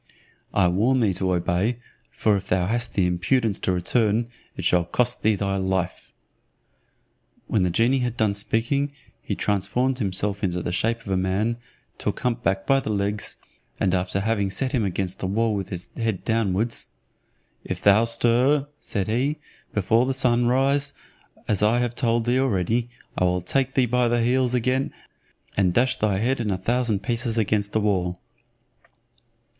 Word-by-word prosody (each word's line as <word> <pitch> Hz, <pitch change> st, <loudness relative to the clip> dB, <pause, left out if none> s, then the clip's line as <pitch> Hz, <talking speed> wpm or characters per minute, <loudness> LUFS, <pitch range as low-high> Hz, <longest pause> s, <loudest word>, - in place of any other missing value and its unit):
I 95 Hz, -3 st, +3 dB
warn 110 Hz, +9 st, +2 dB
thee 105 Hz, -5 st, +2 dB
to 95 Hz, +1 st, -1 dB
obey, 90 Hz, +6 st, 0 dB, 0.3 s
for 105 Hz, -2 st, +1 dB
if 95 Hz, -, -4 dB
thou 90 Hz, -1 st, +1 dB
hast 115 Hz, +4 st, -1 dB
the 95 Hz, -, +3 dB
impudence 100 Hz, +5 st, +1 dB
to -, -, 0 dB
return, 110 Hz, +5 st, +1 dB, 0.3 s
it -, -, -4 dB
shall 90 Hz, -1 st, +4 dB
cost 120 Hz, +8 st, -1 dB
thee 110 Hz, 0 st, +3 dB
thy 100 Hz, 0 st, -1 dB
life." 95 Hz, -1 st, -2 dB, 1.3 s
When 105 Hz, -, 0 dB
the 90 Hz, -, +2 dB
genie 115 Hz, +9 st, +2 dB
had 120 Hz, -1 st, -2 dB
done 110 Hz, -2 st, +2 dB
speaking, 115 Hz, +7 st, -1 dB, 0.3 s
he -, -, -3 dB
transformed 125 Hz, +6 st, 0 dB
himself 100 Hz, 0 st, -1 dB
into 90 Hz, -2 st, -1 dB
the -, -, -2 dB
shape 115 Hz, +5 st, 0 dB
of 110 Hz, -, -10 dB
a 95 Hz, -, +1 dB
man, 100 Hz, +5 st, 0 dB, 0.4 s
took -, -, -3 dB
hump 120 Hz, -1 st, -1 dB
back 95 Hz, -4 st, 0 dB
by 135 Hz, +4 st, +4 dB
the 120 Hz, -, -5 dB
legs, 105 Hz, 0 st, -1 dB, 0.4 s
and 95 Hz, -2 st, +1 dB
after 95 Hz, +1 st, 0 dB
having 100 Hz, -2 st, 0 dB
set 130 Hz, +7 st, -2 dB
him 120 Hz, -6 st, +1 dB
against 95 Hz, -1 st, -2 dB
the 95 Hz, -, -2 dB
wall 110 Hz, +3 st, +1 dB
with 100 Hz, -2 st, -3 dB
his 90 Hz, -1 st, -5 dB
head 110 Hz, -5 st, -2 dB
downwards, 110 Hz, 0 st, 0 dB, 0.8 s
"If -, -, -4 dB
thou 100 Hz, +3 st, +5 dB
stir," 120 Hz, +5 st, +2 dB
said 100 Hz, -4 st, -3 dB
he, 130 Hz, +7 st, 0 dB, 0.3 s
"before 115 Hz, +5 st, +2 dB
the 135 Hz, -, +1 dB
sun 120 Hz, -2 st, +2 dB
rise, 140 Hz, +3 st, +2 dB, 0.5 s
as 105 Hz, -3 st, +2 dB
I 110 Hz, +3 st, +3 dB
have 120 Hz, -1 st, 0 dB
told 115 Hz, -2 st, +1 dB
thee 125 Hz, +2 st, +2 dB
already, 115 Hz, -1 st, 0 dB, 0.3 s
I 90 Hz, -, +1 dB
will 90 Hz, 0 st, +1 dB
take 135 Hz, +7 st, 0 dB
thee 130 Hz, -, +4 dB
by 125 Hz, +1 st, +2 dB
the 120 Hz, 0 st, +1 dB
heels 125 Hz, +1 st, +2 dB
again, 130 Hz, +3 st, 0 dB, 0.6 s
and 90 Hz, -3 st, +2 dB
dash 130 Hz, +2 st, +3 dB
thy 105 Hz, -3 st, +1 dB
head 120 Hz, +5 st, 0 dB
in 110 Hz, -, -1 dB
a 95 Hz, -, 0 dB
thousand 110 Hz, 0 st, 0 dB
pieces 115 Hz, 0 st, -1 dB
against 105 Hz, -2 st, +1 dB
the 110 Hz, -, +2 dB
wall." 90 Hz, -4 st, 0 dB
110 Hz, 175 wpm, -24 LUFS, 95-120 Hz, 1.3 s, thou